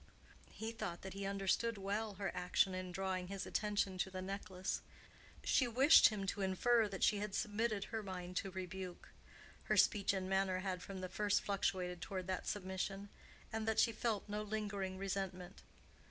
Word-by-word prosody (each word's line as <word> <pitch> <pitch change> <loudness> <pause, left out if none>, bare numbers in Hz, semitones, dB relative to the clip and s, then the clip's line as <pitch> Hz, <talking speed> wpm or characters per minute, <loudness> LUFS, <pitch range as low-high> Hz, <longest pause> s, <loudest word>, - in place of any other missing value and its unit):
He 220 +1 -5
thought 175 -6 -5
that 190 - -6
he 195 0 -3
understood 200 +3 +1
well 205 +2 -2
her 200 0 -2
action 180 +1 +2
in 185 0 -4
drawing 185 0 -2
his 195 0 -4
attention 205 -3 0
to 190 - +1
the 185 0 -5
necklace: 190 -1 -3 0.6
she 260 -5 +3
wished 265 +7 +8
him 205 -3 -3
to 195 +1 -2
infer 220 +4 +3
that 195 -2 -4
she 210 - +4
had 210 -1 -3
submitted 215 -1 0
her 225 +1 -3
mind 180 -3 -6
to 195 - -1
rebuke—her 185 -1 -6
speech 205 -3 +5
and 190 -1 -2
manner 190 -1 +1
had 185 -2 -2
from 190 0 -6
the 185 - -3
first 205 +2 +1
fluctuated 180 -3 -1
toward 185 0 -4
that 185 0 -3
submission—and 200 +3 -4
that 220 - +1
she 230 - +5
felt 220 -2 -1
no 210 +1 -2
lingering 205 -3 -3
resentment. 190 -1 -4
195 Hz, 170 wpm, -38 LUFS, 185-210 Hz, 0.6 s, wished